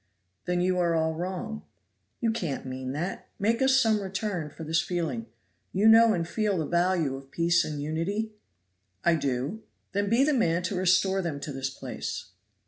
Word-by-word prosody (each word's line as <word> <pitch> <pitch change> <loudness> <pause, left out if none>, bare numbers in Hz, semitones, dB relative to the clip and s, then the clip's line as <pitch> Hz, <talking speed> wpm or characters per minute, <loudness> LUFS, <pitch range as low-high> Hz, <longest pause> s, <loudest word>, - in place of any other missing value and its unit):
"There 180 0 0
you 180 0 +2
are 170 -1 +2
all 160 0 +1
wrong." 185 +6 -4 0.6
"You 230 -2 +2
can't 175 -14 -3
mean 130 0 -4
that; 175 +6 -4
make 225 +4 +1
us 265 0 +5
some 220 -4 +3
return 190 -4 -3
for 160 - -9
this 160 +1 +1
feeling. 155 -11 -2 0.5
You 200 +4 +4
know 225 0 +8
and 165 -1 -2
feel 210 0 0
the 160 - 0
value 170 -5 +1
of 135 0 -10
peace 170 +2 +2
and 150 -2 -4
unity?" 165 +9 -2 0.7
"I 170 - +5
do." 140 - -1 0.3
"Then 200 0 0
be 235 +5 +4
the 300 +1 +3
man 175 -9 +2
to 185 +2 -2
restore 185 +1 +3
them 160 -5 -3
to 145 - -5
this 135 0 -2
place." 135 - -6
175 Hz, 180 wpm, -28 LUFS, 160-205 Hz, 0.7 s, know